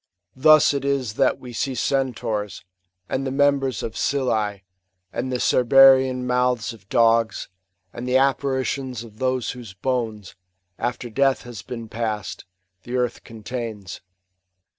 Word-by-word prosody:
Thus 155 Hz, +2 st, +6 dB
it 140 Hz, -, -2 dB
is 135 Hz, -6 st, -1 dB
that 130 Hz, +3 st, +2 dB
we 125 Hz, -1 st, -10 dB
see 135 Hz, +2 st, -2 dB
Centaurs, 120 Hz, -8 st, -2 dB, 0.4 s
and 135 Hz, -, -2 dB
the 135 Hz, -, -2 dB
members 135 Hz, -2 st, +1 dB
of 110 Hz, -, -5 dB
Scyllas, 110 Hz, -7 st, 0 dB, 0.5 s
and 130 Hz, +2 st, -3 dB
the 125 Hz, -, 0 dB
Cerberean 130 Hz, 0 st, +5 dB
mouths 125 Hz, -2 st, 0 dB
of 105 Hz, -3 st, -18 dB
dogs, 115 Hz, -1 st, +2 dB, 0.4 s
and 120 Hz, +1 st, -6 dB
the 125 Hz, +1 st, +3 dB
apparitions 130 Hz, -2 st, 0 dB
of 110 Hz, -1 st, -15 dB
those 130 Hz, -2 st, 0 dB
whose 120 Hz, -7 st, -10 dB
bouQs, 110 Hz, -3 st, -3 dB, 0.5 s
after 120 Hz, 0 st, -3 dB
death 135 Hz, +2 st, +2 dB
has 120 Hz, -5 st, -8 dB
been 115 Hz, +3 st, -7 dB
passed, 110 Hz, -2 st, -4 dB, 0.4 s
the 120 Hz, +5 st, -6 dB
earth 125 Hz, -1 st, -2 dB
con 115 Hz, -2 st, -12 dB
tains. 110 Hz, -7 st, -6 dB
125 Hz, 140 wpm, -23 LUFS, 115-130 Hz, 0.5 s, Thus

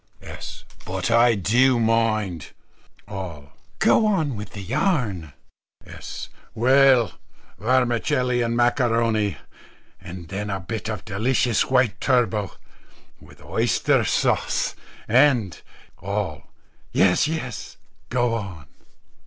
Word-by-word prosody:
S. -, -, -9 dB, 0.2 s
"But 95 Hz, +3 st, -3 dB
I 115 Hz, 0 st, +5 dB
do 120 Hz, +6 st, +3 dB
mind." 110 Hz, -7 st, 0 dB, 0.5 s
All. 85 Hz, -7 st, -7 dB, 0.3 s
"Go 220 Hz, -, +4 dB
on 160 Hz, -, 0 dB
with 105 Hz, 0 st, -8 dB
your 100 Hz, -, -7 dB
yarn." 115 Hz, -, -1 dB, 0.5 s
S. -, -, -8 dB, 0.3 s
"Well, 130 Hz, -1 st, +4 dB, 0.5 s
vermicelli 125 Hz, +1 st, +1 dB
and 115 Hz, 0 st, -1 dB
macaroni, 115 Hz, -, +1 dB, 0.6 s
and 90 Hz, -2 st, -9 dB
then 105 Hz, +2 st, -4 dB
a 95 Hz, -1 st, -2 dB
bit 110 Hz, +4 st, -5 dB
of 105 Hz, -2 st, -5 dB
delicious 115 Hz, +2 st, +1 dB
white 125 Hz, -5 st, +1 dB
turbot, 110 Hz, -6 st, +1 dB, 0.7 s
with -, -, -17 dB
oyster -, -, +1 dB
sauce -, -, 0 dB, 0.3 s
and 120 Hz, -, +3 dB, 0.2 s
" -, -, -27 dB
All. 100 Hz, -5 st, -4 dB, 0.4 s
"Yes, 95 Hz, +8 st, +3 dB
yes; 150 Hz, -8 st, -5 dB, 0.3 s
go 120 Hz, -1 st, +1 dB
on." 95 Hz, -10 st, -5 dB
115 Hz, 105 wpm, -23 LUFS, 100-125 Hz, 0.7 s, I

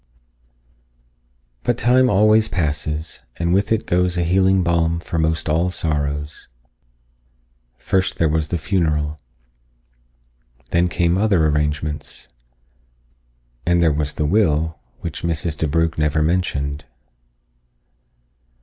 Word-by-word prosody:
But 120 Hz, -, 0 dB
time 125 Hz, +1 st, +3 dB
always 110 Hz, +2 st, +4 dB
passes, 75 Hz, -3 st, -3 dB, 0.2 s
and 85 Hz, +1 st, 0 dB
with 100 Hz, +3 st, +1 dB
it 110 Hz, -1 st, +1 dB
goes 90 Hz, 0 st, +1 dB
a 85 Hz, -, +1 dB
healing 95 Hz, +2 st, +3 dB
balm 85 Hz, -1 st, +1 dB
for 85 Hz, 0 st, -4 dB
most 80 Hz, 0 st, 0 dB
all 80 Hz, +4 st, +1 dB
sorrows. 75 Hz, -3 st, -3 dB, 1.3 s
First 95 Hz, +4 st, -1 dB
there 80 Hz, -, +2 dB
was 80 Hz, 0 st, 0 dB
the 85 Hz, -, -2 dB
funeral. 75 Hz, -4 st, -1 dB, 1.5 s
Then 85 Hz, +1 st, +3 dB
came 85 Hz, +1 st, +1 dB
other 100 Hz, -7 st, +3 dB
arrangements. 75 Hz, 0 st, -2 dB, 1.3 s
And 85 Hz, 0 st, +2 dB
there 80 Hz, -3 st, +3 dB
was 75 Hz, 0 st, -2 dB
the 75 Hz, -, -1 dB
will, 80 Hz, -3 st, +1 dB, 0.3 s
which -, -, -5 dB
Mrs. 80 Hz, -1 st, -1 dB
DeBrugh 80 Hz, +1 st, 0 dB
never 75 Hz, 0 st, +1 dB
mentioned. 75 Hz, -4 st, -1 dB
80 Hz, 110 wpm, -20 LUFS, 75-90 Hz, 1.5 s, always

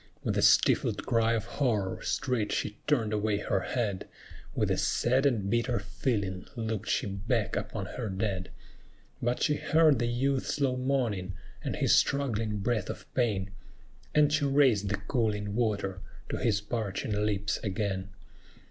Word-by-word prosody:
With -, -, 0 dB
a -, -, +2 dB
stifled -, -, +4 dB
cry 115 Hz, 0 st, +2 dB
of 110 Hz, -1 st, -1 dB
horror 115 Hz, -7 st, -1 dB
straight 120 Hz, -5 st, -1 dB
she 105 Hz, -, -2 dB
turned 115 Hz, -8 st, +2 dB
away 105 Hz, 0 st, +1 dB
her 100 Hz, -1 st, 0 dB
head; 100 Hz, -3 st, -2 dB, 0.5 s
With -, -, +1 dB
a -, -, +1 dB
sad 130 Hz, +4 st, +2 dB
and 110 Hz, -8 st, 0 dB
bitter 120 Hz, +3 st, +1 dB
feeling 100 Hz, -2 st, -2 dB
looked 110 Hz, -3 st, -3 dB
she -, -, +1 dB
back 105 Hz, +3 st, -1 dB
upon 100 Hz, -4 st, -3 dB
her 115 Hz, +3 st, -5 dB
dead; 95 Hz, -1 st, -2 dB, 0.7 s
But 120 Hz, +1 st, 0 dB
she 150 Hz, -1 st, +2 dB
heard 155 Hz, -5 st, +4 dB
the 120 Hz, -, +1 dB
youth's 130 Hz, +4 st, 0 dB
low 135 Hz, -3 st, +2 dB
moaning, 120 Hz, -8 st, -1 dB, 0.3 s
and -, -, -2 dB
his -, -, +3 dB
struggling 115 Hz, -6 st, +1 dB
breath 110 Hz, -2 st, 0 dB
of -, -, -6 dB
pain, 100 Hz, -6 st, 0 dB, 0.6 s
And 150 Hz, -1 st, +5 dB
she 155 Hz, -2 st, +2 dB
raised 130 Hz, -8 st, +3 dB
the 105 Hz, -, 0 dB
cooling 105 Hz, -1 st, -1 dB
water 100 Hz, -4 st, -1 dB, 0.3 s
to -, -, -2 dB
his 105 Hz, -3 st, +1 dB
parching 105 Hz, -1 st, -3 dB
lips 100 Hz, -1 st, 0 dB
again. 95 Hz, -2 st, -2 dB
110 Hz, 155 wpm, -29 LUFS, 100-125 Hz, 0.7 s, And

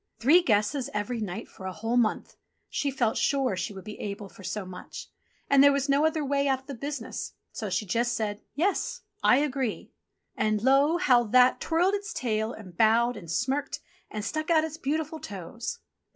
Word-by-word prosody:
Three 295 Hz, +10 st, +6 dB
guesses 245 Hz, +1 st, +1 dB
every 220 Hz, +3 st, -2 dB
night 190 Hz, -4 st, -4 dB
for 190 Hz, -, -9 dB
a -, -, -3 dB
whole 225 Hz, +5 st, -2 dB
month! 235 Hz, -3 st, +1 dB, 0.4 s
She 285 Hz, -, 0 dB
felt 245 Hz, -5 st, 0 dB
sure 270 Hz, -7 st, +1 dB
she 185 Hz, -, -3 dB
would 190 Hz, -2 st, -9 dB
be 210 Hz, 0 st, -9 dB
able 200 Hz, -1 st, -5 dB
for 195 Hz, -, -15 dB
so 190 Hz, +2 st, -3 dB
much; 180 Hz, 0 st, -9 dB, 0.4 s
and 275 Hz, 0 st, +6 dB
there 285 Hz, -, +8 dB
was 280 Hz, 0 st, 0 dB
no 285 Hz, +3 st, +4 dB
other 315 Hz, -2 st, -1 dB
way 280 Hz, 0 st, +1 dB
out 265 Hz, -1 st, +1 dB
of -, -, -30 dB
the 280 Hz, -, -6 dB
business, 275 Hz, -1 st, -5 dB, 0.2 s
so 220 Hz, -5 st, -4 dB
she 210 Hz, -, -1 dB
just 240 Hz, +5 st, 0 dB
said, 210 Hz, -2 st, -2 dB
"Yes! 370 Hz, +8 st, 0 dB, 0.2 s
I -, -, +6 dB
agree 270 Hz, -5 st, -2 dB, 0.2 s
!" -, -, -53 dB
And 215 Hz, 0 st, 0 dB
lor! 280 Hz, +6 st, +4 dB
how 245 Hz, -7 st, +5 dB
That 250 Hz, +3 st, +4 dB
twirled 350 Hz, +4 st, +2 dB
its 410 Hz, +2 st, -3 dB
tail, 220 Hz, -2 st, -1 dB
and 190 Hz, -7 st, -11 dB
bowed, 230 Hz, +4 st, +4 dB
and 170 Hz, -, -10 dB
smirked, 270 Hz, -, -1 dB, 0.3 s
and 210 Hz, -1 st, -5 dB
stuck 310 Hz, +2 st, -3 dB
out 320 Hz, -2 st, +4 dB
its 320 Hz, 0 st, -5 dB
beautiful 315 Hz, +2 st, -2 dB
toes. 230 Hz, -, -6 dB
250 Hz, 195 wpm, -27 LUFS, 215-285 Hz, 0.4 s, there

